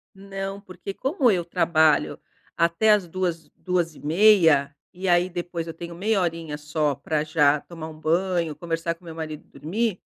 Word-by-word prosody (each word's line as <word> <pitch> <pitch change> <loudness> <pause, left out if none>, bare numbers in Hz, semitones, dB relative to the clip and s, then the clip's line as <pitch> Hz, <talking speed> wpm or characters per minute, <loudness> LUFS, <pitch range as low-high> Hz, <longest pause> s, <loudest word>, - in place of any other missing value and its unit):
Não, 195 0 -6
porque 195 0 -8
como 265 - +1
eu 180 -3 +1
trabalho 165 -3 +2 0.4
até 170 +6 +3
às 200 -4 +2
2h, 170 -2 -3
2:30, 165 -3 +3 0.2
e 185 +1 -4
aí 175 +1 +3
depois 175 -1 -4
eu 165 - -5
tenho 170 +1 -8
meia 200 +4 +1
horinha 165 -4 -3
só 150 -1 -1
pra 155 +3 -2
já 150 -2 +3
tomar 165 -2 -8
um 155 -1 -11
banho, 170 0 0
conversar 165 +1 -3
com 165 - -30
o - - -19
meu 165 - -8
marido 155 -2 -6
e - - -31
dormir, 210 +4 -1
170 Hz, 170 wpm, -24 LUFS, 160-185 Hz, 0.4 s, até